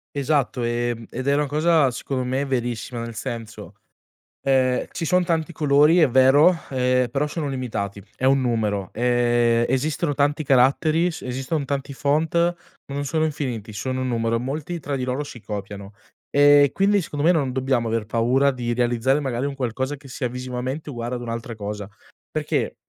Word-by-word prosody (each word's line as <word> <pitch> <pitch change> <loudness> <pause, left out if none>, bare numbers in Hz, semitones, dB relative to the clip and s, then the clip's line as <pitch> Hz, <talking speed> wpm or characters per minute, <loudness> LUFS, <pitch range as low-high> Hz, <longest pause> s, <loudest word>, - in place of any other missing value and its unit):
Esatto, 140 -3 0
e 120 0 -1
ed 130 +2 -5
è 140 - +4
una 150 +1 +1
cosa 155 -1 +3
secondo 130 +2 -3
me 130 +2 -1
verissima, 120 -3 -3
nel 115 0 -6
senso, 110 -1 -7 0.7
ehm, 130 -2 +2
ci 170 - -4
son 180 +3 +3
tanti 165 -1 -1
colori, 150 +3 +4
è 160 - +5
vero, 135 +7 +6 0.2
ehm, 125 -1 +2
però 140 +5 0
sono 150 0 -3
limitati, 110 -7 -4
è 130 - -1
un 135 0 +4
numero, 105 -5 -1
ehm, 120 -1 +2
esistono 145 +4 0
tanti 145 +2 +1
caratteri, 150 +6 +3
s 165 - -7
esiston 135 +4 -3
tanti 140 0 -3
font, 150 +4 0
ma 170 +1 +3 0.4
non 145 0 -2
sono 155 +3 0
infiniti, 130 -9 -3
sono 130 +5 -3
un 130 - -1
numero, 115 -1 0
molti 145 +8 -4
tra 140 0 -3
di 130 - -2
loro 130 +3 -2
si 140 -4 -10
copiano, 100 -1 -7 0.4
e 145 0 +6
quindi 200 +1 +3
secondo 145 -3 -4
me, 170 - +6
non 140 -7 0
dobbiamo 130 -2 0
aver 115 -1 -1
paura 120 +6 +2
di 120 -2 -3
realizzare, 120 +3 +1
magari, 130 -2 -2
un 140 -1 -3
qualcosa 130 +2 -2
che 135 -1 -15
sia 125 0 -3
visivamente 125 +4 -5
uguale 120 -2 -4
ad 120 - -5
un'altra 115 0 -5
cosa, 105 -1 -5 0.4
perché, - - -2
130 Hz, 175 wpm, -23 LUFS, 120-145 Hz, 0.7 s, vero